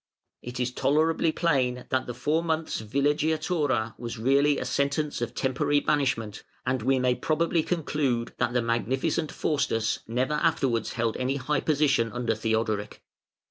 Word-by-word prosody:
It 125 +1 -7
is 125 0 0
tolerably 160 +5 +2
plain 130 -7 0
that 130 - 0
the 120 - -5
four 155 +6 0
months' 160 -6 -1
villeggiatura 145 -1 0
was 120 0 -5
really 140 +5 +3
a - - -3
sentence 145 0 -1
of 120 - -3
temporary 145 +2 +1
banishment, 130 -9 -1 0.2
and 130 -1 0
we 130 +3 +2
may 125 -1 +2
probably 165 +4 +1
conclude 145 -8 -1
that 120 - +1
the 125 -1 +1
Magnificent 130 - 0
Faustus 115 -7 0
never 125 +6 0
afterwards 150 -8 +1
held 115 -2 -1
any 130 +2 -1
high 140 +1 -1
position 140 -7 +2
under 120 -2 0
Theodoric. 110 -1 -2
130 Hz, 145 wpm, -27 LUFS, 120-150 Hz, 0.2 s, really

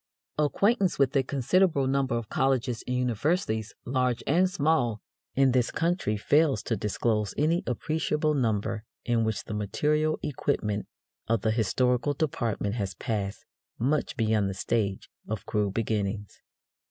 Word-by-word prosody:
Acquaintance 195 - +2
with 135 0 +2
a 135 - +5
considerable 140 +3 +2
number 135 -2 +1
of 115 -2 -4
colleges 130 -2 0
and 125 0 0
universities, 120 - 0
large 125 -2 0
and 180 +6 +3
small, 145 - +1 0.4
in 135 -1 +4
this 125 -1 +2
country 165 - 0
fails 145 +6 +3
to 115 - -1
disclose 105 0 -1
any 165 +5 +2
appreciable 150 +3 0
number 110 -4 0 0.2
in 120 -2 +2
which 110 -1 -1
the - - -6
material 150 +10 +1
equipment 105 -7 -1 0.4
of 115 -1 +1
the 110 - +1
historical 125 +5 +1
department 120 -10 -1
has 100 -5 -3
passed 100 0 -3 0.3
much 140 +6 0
beyond 110 -3 +2
the 95 - -4
stage 100 -1 -1 0.2
of 105 -2 -4
crude 105 -2 -1
beginnings. 105 -2 -2
120 Hz, 140 wpm, -28 LUFS, 110-145 Hz, 0.4 s, a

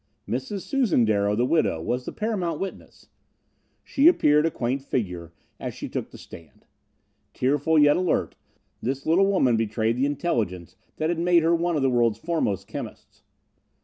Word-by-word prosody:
Mrs. 130 - -3
Susan 245 - +1
Darrow, 105 -1 +1
the 120 +3 +1
widow, 155 - +1
was 125 +9 -3
the - - -5
paramount 185 -8 -2
witness. 195 - -8 0.7
She 285 +3 +3
appeared 150 - +4
a - - +1
quaint 130 -2 -2
figure 90 -11 -4 0.3
as - - -5
she - - -6
took - - -5
the - - -13
stand. 80 -2 -14 0.7
Tearful, 145 +5 +1
yet 145 -1 +5
alert, 180 -2 0 0.5
this 135 +3 -3
little 180 +5 +3
woman 135 - +2
betrayed 110 +1 0
the 135 +2 +1
intelligence 105 - -2 0.2
that 155 +1 -1
had 170 -1 -1
made 175 -1 +3
her 165 +1 +3
one 170 0 0
of 145 - 0
the 135 - +3
world's 120 -3 +2
foremost 115 - -2
chemists. - - -9
140 Hz, 165 wpm, -25 LUFS, 115-170 Hz, 0.7 s, yet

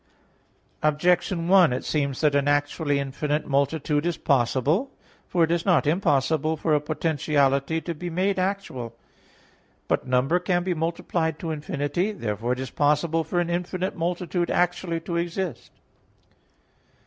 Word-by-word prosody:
Objection 170 +3 +1
1: 185 -5 +6
It 125 - -3
seems 140 -4 -1
that 150 -2 +3
an 140 0 +2
actually 145 0 +1
infinite 145 +2 -2
multitude 145 +1 0
is 175 0 -1
possible. 140 - +1 0.4
For 175 - +2
it 165 - +1
is 170 -1 +1
not 180 -5 +3
impossible 155 -1 +1
for 155 0 0
a 150 - +3
potentiality 150 -1 0
to 170 - -4
be 175 +3 -6
made 185 +3 0
actual. 185 - -3 0.9
But - - 0
number 130 +7 +2
can 175 0 0
be 180 0 0
multiplied 165 -1 -2
to 165 0 -4
infinity. 150 +6 -2
Therefore 115 - -2
it 125 - -5
is 130 - -5
possible 150 +3 +1
for 175 +3 -1
an 175 0 -1
infinite 180 +2 -2
multitude 175 0 -2
actually 175 -1 0
to 170 +1 -3
exist. 170 -2 -3
160 Hz, 145 wpm, -25 LUFS, 145-175 Hz, 0.9 s, 1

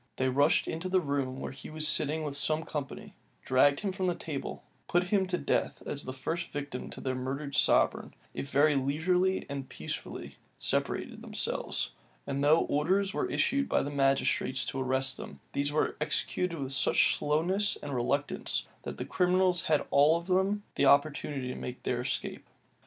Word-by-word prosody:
They 130 0 +1
rushed 145 +4 +3
into 165 +3 -3
the 185 0 +4
room 140 -4 -2
where - - -4
he 135 - -10
was 155 0 0
sitting 155 +1 +2
with 145 -2 -3
some 155 +2 +2
company; 145 -3 -6 0.3
dragged 140 +2 +4
him 200 -2 -1
from 185 0 -2
the 175 - +1
table; 150 -5 -5 0.2
put 175 +1 +1
him 195 -2 +2
to 180 -1 0
death - - -1
as 145 - -4
the 130 - -4
first 160 +6 -3
victim 145 -3 -5
to - - -8
their 130 - -1
murdered 135 +3 -4
sovereign - - +2 0.2
f - - -4
very 145 +2 +4
leisurely 180 +8 +1
and 140 -2 -5
peaceably - - -6 0.2
separated - - -1
themselves; - - -2 0.3
and 140 +1 -2
though 155 +3 +5
orders 190 +7 +1
were - - -1
issued 275 0 +1
by - - +2
the 145 - -4
magistrates 135 -1 +1
to 135 - -3
arrest 130 0 +1
them, - - -9
these 145 +1 0
were 155 - +1
executed 180 -2 0
with 135 -2 -2
such - - +4
slowness 175 +8 +1
and 145 -1 -4
reluctance, 140 +3 -1 0.2
that - - -6
the - - -4
criminals 180 0 +2
had 155 -2 +2
all 150 +4 +5
of 170 - -7
them 190 +3 +1
the - - +2
opportunity 140 -2 +2
of - - -6
making 125 0 -6
their 120 -1 -1
escape. 130 +1 -3
145 Hz, 180 wpm, -30 LUFS, 135-175 Hz, 0.3 s, though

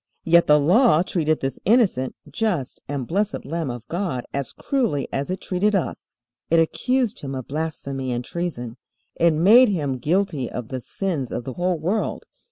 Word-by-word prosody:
Yet 170 +1 +5
the 150 0 +6
Law 175 - +5
treated 155 -4 0
this 135 -1 -3
innocent, 195 - +2
just, 180 - -2
and 140 -3 -3
blessed 200 - -1
Lamb 165 -2 -3
of 120 -2 -7
God 170 -8 -2
as 140 -3 -3
cruelly 235 - -1
as 140 +3 -2
it 185 0 -3
treated 200 +3 +1
us. 185 - -3 0.3
It 165 - +4
accused 245 +8 +1
Him 135 -1 -5
of 130 -2 -6
blasphemy 140 -3 -3
and 120 0 -3
treason. 130 -10 -4 0.4
It 170 - +5
made 210 +11 +6
Him 145 -9 -1
guilty 155 -3 0
of 120 -3 -6
the 130 - -3
sins 150 -2 -3
of - - -3
the 130 - -6
whole 180 +2 0
world. 185 +8 -1
160 Hz, 175 wpm, -23 LUFS, 135-190 Hz, 0.4 s, the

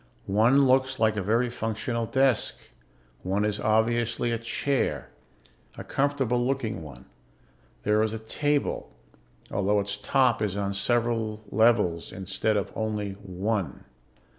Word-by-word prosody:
One 115 +8 +4
looks 130 0 +2
like 110 -1 +3
a 105 - -1
very 115 +5 +1
functional 115 +1 -2
desk. 130 -3 +2 0.6
One 100 +3 0
is 105 -1 -1
obviously 115 +2 +1
a 115 - -1
chair... 125 +4 -1 0.7
a - - -6
comfortable 135 -4 0
looking 120 -8 -2
one. 75 -3 -11 0.8
There 105 +1 +3
is 110 -1 +1
a 110 - -3
table, 145 +6 -1 0.6
although 100 +1 +2
its 100 0 -2
top 125 +1 +2
is 100 -2 -1
on 100 -1 -1
several 115 0 0
levels 105 -6 +2
instead 95 +3 -1
of 100 - -2
only 105 -2 -2
one. 100 +1 -3
110 Hz, 130 wpm, -27 LUFS, 105-120 Hz, 0.8 s, One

